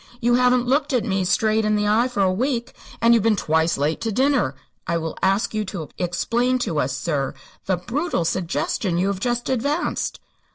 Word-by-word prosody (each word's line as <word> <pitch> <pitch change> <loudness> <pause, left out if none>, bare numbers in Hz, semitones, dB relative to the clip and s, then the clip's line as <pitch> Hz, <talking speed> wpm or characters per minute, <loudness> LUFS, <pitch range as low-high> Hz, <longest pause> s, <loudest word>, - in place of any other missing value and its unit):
You 240 -1 +2
haven't 250 0 +3
looked 275 +3 +1
me 195 -3 0
straight 220 +4 +2
in 215 0 +2
the 210 0 +1
eye 225 +4 +3
for 240 -6 0
a 185 -1 +2
week, 240 +3 -1 0.3
and 230 0 +6
you've 230 - +4 0.2
twice 160 -1 +1
been - - -5
late 155 +2 0
to 225 -1 -1
dinner. 255 - +1 0.3
I 170 - +1
will 160 -1 -4
ask 195 +4 +1
you 215 0 0
to 180 -6 -6
explain 235 +8 0
to 155 -3 -1
us, 135 0 -1
sir, 145 -5 -2 0.3
the 185 -1 +1
brutal 240 - -2
suggestion 175 +1 -1
you 185 +3 +1
have 200 -2 -2
just 240 +2 -1
advanced." 285 +6 -1
210 Hz, 195 wpm, -22 LUFS, 175-245 Hz, 0.3 s, and